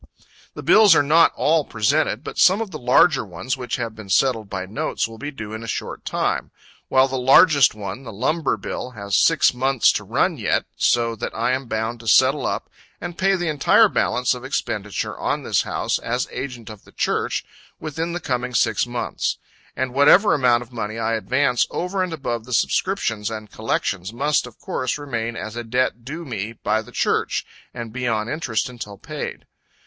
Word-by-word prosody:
The - - -7
bills 210 -5 +7
are 145 - +4
not 160 +4 +5
all 155 0 +2
presented, 120 +2 0
but - - -6
some 190 +3 +5
of 225 -4 -4
the 155 - -6
larger 130 +4 +4
ones 95 +7 -4
which 125 -2 -4
have 115 -3 -4
been 110 -3 -11
settled 110 -2 +2
by 95 -2 -4
notes 105 +3 -2
will 115 0 -12
be 145 - -4
due 110 -7 -8
in 110 - -6
a 115 - -8
short - - -5
time; - - -1 0.4
while 130 0 +4
the 130 -1 -3
largest 135 +1 +6
one, 100 +3 -6
the 125 - -9
lumber 135 +9 0
bill, - - -5
has 100 -1 -2
six 165 -6 +4
months 130 0 +3
to - - -3
run - - 0
yet, - - 0
so 115 -1 +2
that - - -5
I 115 +2 0
am 130 0 -2
bound 110 +1 -2
to 115 - -11
settle 95 - +4
up - - -3 0.3
and 175 0 -6
pay 195 +2 +2
the 175 -2 -2
entire 150 -3 +4
balance 125 +1 +1
of 125 0 -8
expenditure 110 -6 -3
on - - -1
this - - +1
house, - - -1
as 125 +2 -2
agent 120 -4 -6
of 105 - -12
the - - -19
Church, - - -1 0.3
within 160 +2 -4
the 175 - -2
coming 125 -4 -3
six 110 -1 +2
months. 120 0 -2 0.4
And 130 -1 -2
whatever 150 +10 +6
amount 125 -4 +3
of 120 +1 -19
money 110 -1 -4
I 115 0 -1
advance 125 +2 +1
over 185 +2 -2
and 185 -1 -1
above 120 -8 -4
the 125 - -6
subscriptions 115 - 0
and 110 -2 -7
collections 100 -3 -2
must, 140 +3 0
of 120 - -14
course, 130 +1 -3
remain 120 -5 -4
as 110 -1 -6
a 120 - -4
debt 120 0 -1
due 155 +7 -7
me 115 -4 -4
by 110 -1 -1
the 110 - -14
Church, - - 0 0.3
and 115 -2 -7
be 125 0 -3
on 110 -2 0
interest 130 -6 -2
until 115 -5 -8
paid. - - -6
125 Hz, 195 wpm, -22 LUFS, 110-145 Hz, 0.4 s, bills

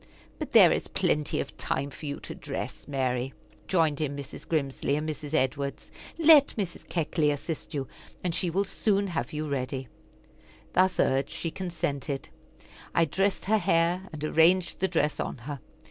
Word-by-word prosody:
"But - - -4
there - - +9
is - - 0
plenty 150 -1 0
of - - -4
time 140 +1 -1
for 150 - -8
you 145 - -3
to - - -7
dress, - - -6
Mary," 130 -2 -1 0.3
joined 160 -5 +2
in 145 -2 -1
Mrs. 140 -1 -8
Grimsly 140 -3 0
and 150 +1 -2
Mrs. 150 0 -4
Edwards. 140 0 -1 0.3
"Let 315 -3 +7
Mrs. 190 -5 -4
Keckley 160 -2 +1
assist 145 +2 -4
you, 135 -2 -2 0.4
and 180 -2 0
she 175 - 0
will 195 +4 +1
soon 200 0 +1
have 165 -10 -3
you 155 0 -3
ready." 135 -1 -3 0.9
Thus 185 +1 +3
urged, 135 +1 +2
she 165 - -4
consented. 160 -7 -3 0.7
I 165 - +5
dressed 195 +5 0
her 215 +3 +3
hair, 175 +2 +2
and 155 -2 -7
arranged 170 +4 +3
the 190 - +2
dress 160 -4 0
on - - -3
her. 140 +4 -6
155 Hz, 165 wpm, -28 LUFS, 140-180 Hz, 0.9 s, there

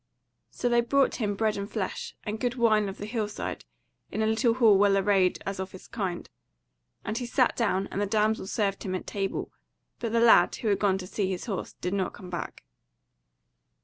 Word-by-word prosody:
So 245 - -2
they 240 0 +4
brought 275 +3 +2
him 205 -4 -1
bread 215 0 0
and 200 +1 -4
flesh, 205 -5 -4
and 215 +1 -4
good 245 +1 -1
wine 215 -4 +3
of 195 - -8
the 205 - -6
hill 215 -1 -2
side, 210 - -5 0.4
in 220 - -1
a - - +2
little 225 +2 +2
hall 230 -5 +6
well 195 0 +4
arrayed 195 -2 +3
as 195 0 -4
of 190 0 -5
its 185 - -12
kind; 190 -6 -4 0.8
and 215 +3 -2
he 245 - -4
sat 250 0 +2
down 195 -5 +1
and 200 - -2
the 205 - 0
damsel 215 -1 +1
served 200 -2 -1
him 185 -2 -3
at - - -5
table, 195 -1 -3 0.5
but 230 -2 -3
the 230 - +2
lad, 230 -1 +6
who 225 - -2
had 200 - +2
gone 195 -2 +2
to 185 - -6
see 200 +2 -2
to - - -1
his 185 -2 -3
horse, 200 -6 -4
did 180 +2 -4
not 190 -2 -1
come 180 -2 -10
back. 175 - -5
205 Hz, 215 wpm, -28 LUFS, 195-225 Hz, 0.8 s, hall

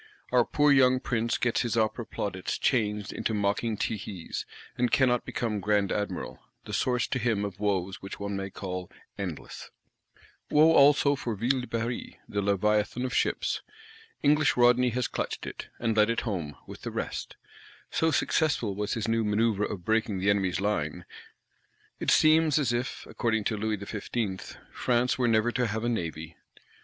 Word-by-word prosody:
Our 125 -2 +4
poor 150 -1 +3
young 130 -2 +5
Prince 115 -3 -1
gets 120 -1 +1
his 120 -2 -1
Opera 110 +1 0
plaudits 95 -3 -3
changed 105 -5 0
into 110 - -2
mocking 105 +2 0
tehees; 100 -5 -4 0.3
and 125 0 +1
cannot 125 -3 +3
become 110 -3 -2
Grand 100 0 +1
Admiral,—the 105 0 -5
source 125 -2 +1
to 130 - -1
him 110 -4 0
of 95 -2 -7
woes 95 -2 -1
which 95 - -8
one 100 0 -3
may 95 0 -3
call 90 -2 -5 0.3
endless. 90 -6 -6 0.8
Woe 155 +2 +6
also 140 -1 +5
for 120 -5 -3
Ville 125 +5 +1
de 125 - -7
Paris, 115 +1 -3
the 100 - -2
Leviathan 105 +4 +1
of 125 - -3
ships! - - 0 0.6
English 150 0 +3
Rodney 125 +1 +5
has 125 +1 -1
clutched - - -4
it, - - -7
and 115 -2 0
led 105 0 +4
it 115 - 0
home, 85 - -3
with - - -10
the - - -4
rest; - - -4 0.6
so 160 - +2
successful 145 -7 +1
was 105 +1 -2
his 115 -1 -2
new 115 0 +1
"manœuvre 105 0 +1
of 90 -4 -6
breaking 110 -2 +1
the 100 +2 +2
enemy's 95 -3 0
line." 105 +1 -1 0.9
It - - -1
seems 155 -1 +5
as 130 -6 +1
if, 120 +2 -3
according 110 -3 -1
to 110 - 0
Louis 105 0 -1
XV., 100 0 -4
"France 125 +1 +1
were 125 - +3
never 115 +1 +3
to 125 0 0
have 110 +1 -3
a 120 - +1
Navy." 85 -6 -4
110 Hz, 170 wpm, -28 LUFS, 100-125 Hz, 0.9 s, Woe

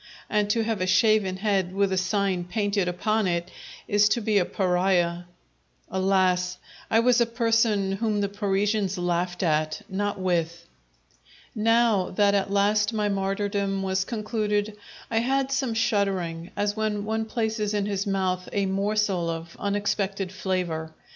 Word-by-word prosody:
And 210 -1 +1
to 225 +2 +2
have 220 -3 -2
a 185 - 0
shaven 210 -2 +3
head 190 -2 0
with 200 -1 +2
a - - +1
sign 185 -1 0
painted 200 0 0
upon 215 +4 0
it 175 0 -2 0.4
is 205 0 +4
to 215 - +1
be 210 -2 +2
a 180 - +1
pariah. 180 -2 +1 0.7
Alas! 185 -1 +1 0.3
I 225 - +4
was 245 0 +4
a 235 - +3
person 225 -4 +1
whom 210 +1 -1
the 200 - +1
Parisians 200 0 0
laughed 175 +1 -1
at, 155 -2 0
not 205 +1 -2
with! 170 -2 -1 0.9
Now 225 -3 +2
that 200 +1 +2
at 200 0 +1
last 210 +2 +2
my 210 -1 0
martyrdom 195 0 -1
was 190 0 0
concluded, 215 -1 -2 0.4
I 225 - 0
had 270 +3 0
some 265 -4 0
shuddering, 190 -6 0
as 205 0 0
when 215 -2 -1
one 220 +1 -1
places 220 -2 -2
in 205 -1 0
his 200 -1 -2
mouth 185 -2 -1
a 200 -1 0
morsel 195 -2 0
of 165 0 -6
unexpected 200 -1 -1
flavour. 180 -5 -3
200 Hz, 150 wpm, -25 LUFS, 185-215 Hz, 0.9 s, is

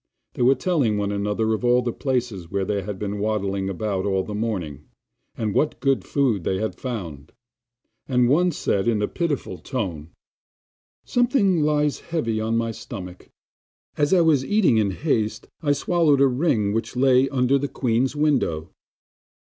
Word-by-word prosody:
They - - -5
were 130 +3 +5
telling 135 - +1
one 100 0 -1
another 105 +2 0
of 110 - -3
all 125 0 +3
the 120 -1 -2
places 120 - -2
where 100 0 -1
they 100 0 -1
had 100 +1 -6
been 105 0 -4
waddling 100 -2 -1
about 95 0 -2
all 95 -1 0
the 105 - -7
morning, 95 - -3 0.5
and 110 -3 -2
what 150 - 0
good 135 -1 +1
food 125 - 0
they 95 - 0
had 110 +2 -2
found; 85 - -6 0.8
and 125 -2 +3
one 175 +7 +3
said 100 -8 -1
in 115 -3 +2
a - - +1
pitiful 145 - -3
tone: 85 - -4 1.0
'Something 240 - +2
lies 150 -1 +1
heavy 115 -10 -2
on 110 +1 0
my 115 0 -1
stomach; 90 -6 -9 0.7
as 145 -1 +1
I 185 -2 +5
was 155 -5 +3
eating 195 - +3
in 105 -2 +2
haste 110 - -1
I 145 -3 +1
swallowed 150 0 +2
a - - +7
ring 125 -7 +1
which 115 +2 -3
lay 130 +1 +4
under 130 +1 +2
the 140 - -2
queen's 130 +1 0
window. 135 - 0
115 Hz, 165 wpm, -23 LUFS, 100-140 Hz, 1.0 s, a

